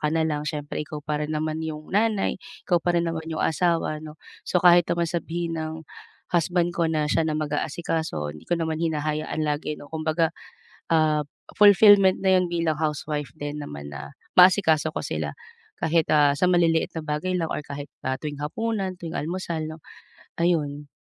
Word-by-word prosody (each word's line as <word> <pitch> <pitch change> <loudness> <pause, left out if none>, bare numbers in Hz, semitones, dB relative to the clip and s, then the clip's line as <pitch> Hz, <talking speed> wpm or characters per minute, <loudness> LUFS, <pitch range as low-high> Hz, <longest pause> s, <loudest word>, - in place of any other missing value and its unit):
ka 150 - 0
na 165 - +2
lang 150 -1 -2
siyempre 145 -2 -4
ikaw 150 0 -7
pa 150 0 -2
rin 150 +1 -2
naman 155 +1 -2
'yung 155 -1 -7
nanay, 210 -1 +1 0.2
ikaw 175 - +2
pa 175 +1 0
rin 170 - +3
naman 160 -1 -5
'yung 160 -1 -2
asawa 165 -2 +1
'no. 155 -1 -9 0.3
So 180 - +1
kahit 175 -1 +7
naman 170 0 +1
sabihin 170 -1 -3
ng 155 0 -4 0.6
husband 175 0 +1
ko 170 -1 0
na 155 -2 0
siya 160 +2 +1
na 155 - -1
mag-aasikaso, 150 - -2
'di 75 - -14
ko 175 - +2
naman 160 -1 -2
hinahayaan 155 -1 -1
lagi 150 0 -2
'no, 145 - -13
kumbaga, 160 +1 0 0.6
ah, 155 -2 +3 0.3
fulfillment 205 -2 +7
na 190 -1 +4
'yun 180 -1 0
bilang 165 -2 0
housewife 150 -3 -2
din 145 +3 -6
naman 70 - -8
na 70 - -8 0.2
maasikaso 180 -4 +5
ko - - -3
sila, 75 -1 -3 0.5
kahit, 165 0 +2
ah, 145 -2 +4
sa - - +1
maliliit 165 -2 +2
na 165 - -4
bagay 155 +4 -2
lang 165 -3 0
or 150 - -4
kahit, 145 0 -7 0.2
ah, 130 0 -2
tuwing 150 -2 -5
hapunan, 200 +3 -2
tuwing 165 -1 -5
almusal, 170 0 -3
'no, 155 +1 -7 0.6
ayun. 150 -4 0
160 Hz, 180 wpm, -25 LUFS, 150-170 Hz, 0.6 s, kahit